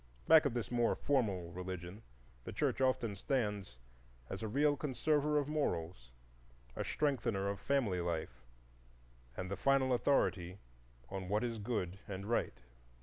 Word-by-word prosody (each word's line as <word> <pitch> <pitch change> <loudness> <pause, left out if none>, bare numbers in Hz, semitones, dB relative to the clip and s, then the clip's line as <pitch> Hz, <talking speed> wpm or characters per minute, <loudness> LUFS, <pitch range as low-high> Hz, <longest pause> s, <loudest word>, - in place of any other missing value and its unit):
Back 160 -1 +8
of 130 -4 0
this 120 -1 -2
more 120 -1 +2
formal 100 -11 0
religion, 90 +2 -6 0.4
the - - -6
Church - - 0
often 130 -5 +1
stands 105 - -2 0.5
as - - -4
a 110 - -2
real 145 +6 +3
conserver 150 +1 +1
of 145 -2 +1
morals, 85 - -2 0.7
a - - -2
strengthener 120 -9 0
of 100 0 -2
family 110 -8 +1
life, 80 -7 -3 0.9
and 90 +1 -4
the - - 0
final 135 +2 +3
authority 95 -9 +1 0.5
on 95 -1 -4
what 105 +3 +1
is 115 -2 -2
Good 100 -4 -2
and 100 0 -5
Right. 115 - -1
110 Hz, 145 wpm, -35 LUFS, 90-135 Hz, 0.9 s, Back